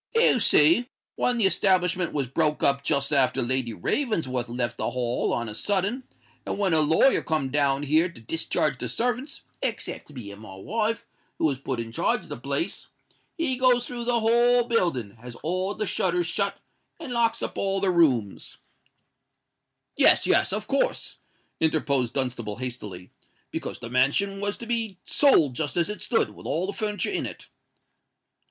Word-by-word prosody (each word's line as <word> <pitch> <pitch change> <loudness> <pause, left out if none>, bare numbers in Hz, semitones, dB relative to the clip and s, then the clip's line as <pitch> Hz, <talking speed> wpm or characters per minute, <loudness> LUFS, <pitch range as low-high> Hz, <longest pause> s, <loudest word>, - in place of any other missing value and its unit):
"You 455 - +4
see, 185 - +5 0.3
when 250 -1 +1
the 225 - +3
establishment 185 -2 +2
was 140 -3 -1
broke 150 +4 0
up 140 0 +3
just 140 +1 +1
after 135 -3 +4
Lady 125 -1 0
Ravensworth 130 - -2
left 120 -1 -3
the - - -2
Hall 120 0 -1
on 120 -1 -2
a 105 - -5
sudden, 205 - -1 0.4
and - - -4
when 195 -4 +1
her 160 - +5
lawyer 160 - +3
come 155 -5 -2
down 140 -1 +1
here 155 +5 +2
to 170 - -14
discharge 145 +1 0
the 125 - -3
servants, 250 - -2 0.2
except - - -3
me 125 -9 -9
and 100 +1 -12
my 110 -3 -11
wife, 220 - -2 0.3
who - - 0
was 140 -4 0
put 130 -3 -4
in 115 -1 -5
charge - - 0
o' - - -17
the - - -5
place, - - -3 0.5
he 300 -6 -1
goes 250 -1 +3
through 240 -1 -6
the 240 -1 +1
whole 240 +2 +4
building, 170 - -1
has 120 0 -10
all 185 +4 -1
the 215 - -2
shutters 180 -2 0
shut, 200 +4 -1 0.4
and 295 -7 -6
locks 230 -1 +1
up - - -4
all 195 0 +1
the 195 -1 +2
rooms——" 130 - +1 1.4
"Yes, - - +5
yes—of - - +2
course," - - -1 0.4
interposed 140 -6 0
Dunstable, 120 -6 -2
hastily: 105 -8 -6 0.4
"because - - -5
the - - -8
mansion 145 +11 +1
was 205 0 -2
to 235 - -8
be 225 -5 -2
sold 170 - +4
just 145 +3 -3
as 170 +1 +1
it 210 - -5
stood, 230 - 0
with - - -11
all 170 +3 -1
the 200 - -4
furniture 210 - -2
in 380 - -2
it." - - -10
165 Hz, 175 wpm, -25 LUFS, 130-215 Hz, 1.4 s, see